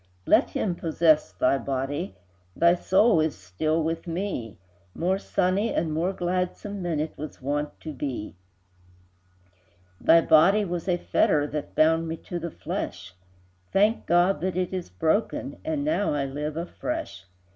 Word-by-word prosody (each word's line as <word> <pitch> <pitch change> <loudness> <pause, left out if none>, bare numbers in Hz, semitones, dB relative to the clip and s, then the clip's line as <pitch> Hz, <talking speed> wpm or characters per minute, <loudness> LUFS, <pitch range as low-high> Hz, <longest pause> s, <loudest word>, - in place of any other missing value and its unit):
Let - - +4
him 190 - -1
possess 160 -2 +2
thy 135 +2 +1
body, 135 -7 -3 0.4
Thy 170 0 +5
soul 190 +2 +3
is 155 -1 -1
still 155 - -1
with 165 +2 -3
me, 165 - -4 0.4
More 185 +3 0
sunny 195 +3 0
and 160 -1 -1
more 170 +4 0
gladsome 185 +2 -3
Than 170 -4 -1
it 155 +1 -3
was 155 0 -7
wont 145 +2 -3
to 155 - -6
be: 130 -8 -5 1.6
Thy 165 +1 +6
body 180 +7 +5
was 175 -1 -4
a 180 -2 +2
fetter 150 -3 +2
That 150 0 -5
bound 160 +1 +3
me 165 0 -4
to 175 +2 -6
the 170 +1 -4
flesh, 90 - -5 0.6
Thank 210 +4 +2
God 175 0 +3
that 185 0 -1
it 185 0 -1
is 185 - -4
broken, 160 - -1
And 310 -2 -2
now 245 - +1
I 140 -1 0
live 150 +3 -4
afresh! 180 - -5
165 Hz, 150 wpm, -26 LUFS, 150-185 Hz, 1.6 s, Thy